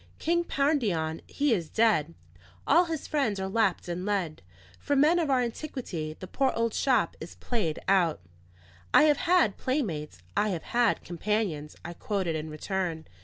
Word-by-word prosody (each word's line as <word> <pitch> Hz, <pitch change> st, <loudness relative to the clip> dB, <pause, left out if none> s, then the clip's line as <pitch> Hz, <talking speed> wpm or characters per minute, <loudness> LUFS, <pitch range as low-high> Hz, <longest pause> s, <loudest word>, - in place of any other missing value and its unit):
"King 345 Hz, +1 st, +1 dB
Pandion 220 Hz, -, 0 dB
he 285 Hz, -3 st, +1 dB
is 170 Hz, -7 st, -2 dB
dead; 185 Hz, -9 st, +2 dB, 0.5 s
all 350 Hz, +2 st, +5 dB
his 325 Hz, -3 st, -4 dB
friends 250 Hz, -10 st, 0 dB
are 190 Hz, -, -2 dB
lapped 200 Hz, -3 st, +1 dB
in 175 Hz, +1 st, -3 dB
lead. 190 Hz, -, -2 dB, 0.4 s
For 285 Hz, -, 0 dB
men 305 Hz, +5 st, +4 dB
of 320 Hz, -4 st, 0 dB
our 260 Hz, -2 st, +3 dB
antiquity, 230 Hz, -, -5 dB
the -, -, -6 dB
poor 265 Hz, +8 st, +1 dB
old 230 Hz, -1 st, 0 dB
shop 265 Hz, -2 st, +1 dB
is -, -, -8 dB
played 195 Hz, -11 st, -2 dB
out." 180 Hz, -, +3 dB, 0.8 s
"I -, -, +8 dB
have 300 Hz, -2 st, +4 dB
had 330 Hz, -, +3 dB
playmates, 160 Hz, -, -3 dB
I 210 Hz, -, +2 dB
have 175 Hz, -5 st, -3 dB
had 240 Hz, -2 st, +1 dB
companions," 175 Hz, -4 st, -2 dB
I 170 Hz, -, -5 dB
quoted 185 Hz, -3 st, -2 dB
in 155 Hz, 0 st, -4 dB
return. 165 Hz, 0 st, -3 dB
205 Hz, 165 wpm, -28 LUFS, 165-270 Hz, 0.8 s, I